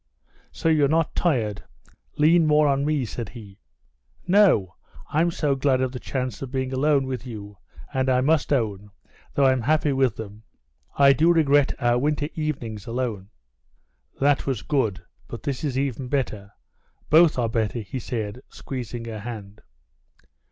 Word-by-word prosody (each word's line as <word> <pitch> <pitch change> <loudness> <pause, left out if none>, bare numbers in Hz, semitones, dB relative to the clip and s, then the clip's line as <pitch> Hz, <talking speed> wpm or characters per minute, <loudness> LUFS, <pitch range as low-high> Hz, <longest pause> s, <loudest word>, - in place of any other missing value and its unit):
"So 165 - -3
you're 155 -3 +4
not 160 +2 +1
tired? 115 - 0 0.5
Lean 160 +2 +4
more 150 0 +4
on 140 0 +1
me," 150 -4 0
said 115 -1 -6
he. 105 -5 -12 0.7
"No, 180 - +4 0.4
I'm 165 +3 +2
so 150 -4 0
glad 135 -1 +1
of 130 0 -1
a - - -4
chance 130 -5 -4
of 135 - -5
being 130 0 -3
alone 140 +1 +2
with 130 -1 -5
you, 105 -4 -9 0.3
and 130 0 0
I 125 -1 +3
must 150 +2 +1
own, 105 -6 -1 0.5
though 140 - +3
I'm 130 -1 +3
happy 150 +3 +1
with 130 -5 +2
them, 105 -1 -9 0.6
I 140 -1 +7
do 160 +6 +4
regret 145 -4 +3
our 120 0 +2
winter 145 +2 0
evenings 120 -10 -4
alone." 115 -5 -3 0.9
"That 140 0 +2
was 130 -6 -2
good, 110 - -1 0.2
but 120 - -8
this 140 -1 -3
is 135 -4 -2
even 135 -2 -2
better. 110 -7 -2 0.6
Both 160 -1 +6
are 120 -2 +1
better," 115 0 -1
he 110 +6 -6
said, 115 -1 -4
squeezing 120 -3 -6
her 110 -2 -6
hand. 105 -2 -8
130 Hz, 160 wpm, -24 LUFS, 115-145 Hz, 0.9 s, I